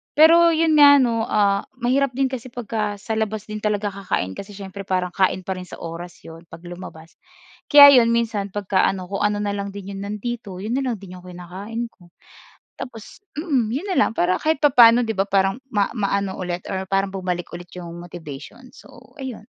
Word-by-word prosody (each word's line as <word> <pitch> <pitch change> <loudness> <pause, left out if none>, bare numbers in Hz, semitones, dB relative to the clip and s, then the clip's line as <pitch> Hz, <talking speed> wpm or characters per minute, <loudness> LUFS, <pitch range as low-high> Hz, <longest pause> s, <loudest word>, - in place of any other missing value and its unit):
Pero' 330 +3 +7
yon 315 -2 +3
nga 285 0 +9
'no, 235 -5 +1
ah, 200 -1 +1
mahirap 255 +1 0
din 270 0 0
kasi 255 -1 -6
pagka 220 -4 -3
sa 220 +2 -4
labas 215 -1 -2
din 215 - -4
talaga 210 -1 -1
kakain 190 - -3
kasi 200 - -9
siyempre 195 0 -9
parang 180 -1 -1
kain 190 0 +1
pa 190 0 -4
rin 180 - -9
sa - - -9
oras 170 +1 -9
'yon 165 +1 -13
'pag 165 +1 -13
lumabas, 175 -2 -11 0.5
kaya 285 -3 +10
'yon 230 - +3
minsan 220 -4 -1
pagka 195 -1 -1
ano 185 0 -4
kung 195 - -2
ano 210 0 0
na 205 - -1
lang 200 0 -4
din 200 0 -7
'yon 195 - -7
nandito 210 -1 -5
'yon 225 +4 -2
na - - -2
lang 240 - -1
din 185 -3 -11
yung 180 - -17
kinakain 195 +7 -7
ko. 175 - -21 0.7
Tapos, 235 - -10 0.2
mm, 270 -10 0
'yon 295 - -3
nalang - - +3
para 185 -4 +1
kahit 315 -1 +1
papaano, 245 -5 +6
'di 225 - -2
ba? 195 - +2
Parang 195 +5 +1
ma 205 -2 +2
maano 200 -3 -1
ulit 180 -1 -5
or 190 0 -3
parang 195 0 +2
bumalik 180 -2 -3
ulit 175 0 -11
yung 170 -1 -8
motivation, 175 - -10
so - - -17
ayun. 250 -5 -7
205 Hz, 200 wpm, -22 LUFS, 185-235 Hz, 0.7 s, kaya